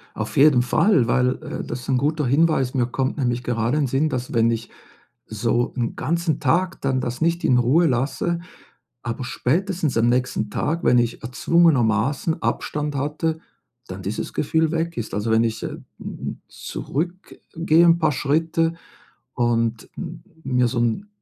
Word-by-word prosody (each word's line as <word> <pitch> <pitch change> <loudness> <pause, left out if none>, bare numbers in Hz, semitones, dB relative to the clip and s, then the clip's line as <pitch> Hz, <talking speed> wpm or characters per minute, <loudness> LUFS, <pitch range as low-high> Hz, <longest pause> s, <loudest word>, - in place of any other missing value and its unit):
Auf 110 +6 -4
jeden 140 -3 +6
Fall, 130 - +3
weil, 125 +1 +2
äh, - - -5
das 120 +1 -5
ist 130 - -10
'n 130 - +3
guter 150 +2 0
Hinweis. 140 -1 +2
Mir 125 -2 +1
kommt 130 +3 -2
nämlich 125 -3 -1
gerade 120 +3 0
in 145 -3 +1
Sinn, 140 +5 +1
dass 125 -1 -4
wenn 115 0 +3
ich 115 - -4 0.6
so 115 +3 -1
'n 120 -2 -1
ganzen 165 0 -1
Tag 170 +6 +1
dann, 135 -1 0
das 125 +4 -4
nicht 170 +1 +1
in 125 - +4
Ruhe 135 +8 +4
lasse, 135 +7 0 0.6
aber 120 +2 -4
spätestens 165 - -1
am 115 +1 +3
nächsten 125 -4 0
Tag, 165 +9 -2
wenn 125 - +4
ich 120 -1 0
erzwungenermaßen 135 0 +2
Abstand 150 -1 -2
hatte, 150 +3 -1 0.5
dann 95 +1 -7
dieses 100 +3 -4
Gefühl 160 +1 +1
weg 165 0 -2
ist. 110 - -4
Also, 105 +2 -1
wenn 110 +1 +4
ich, 115 0 -2
äh, - - -2
hm, - - -9 0.2
hm, - - -6
zurückgehe 170 0 -1
'n 170 0 +5
paar 155 -2 +2
Schritte 165 +4 +1 0.6
und 115 -1 0
m 165 -2 -7 0.2
mir 125 -2 +2
so 120 0 -2
'n 120 - 0
135 Hz, 165 wpm, -22 LUFS, 120-160 Hz, 0.6 s, jeden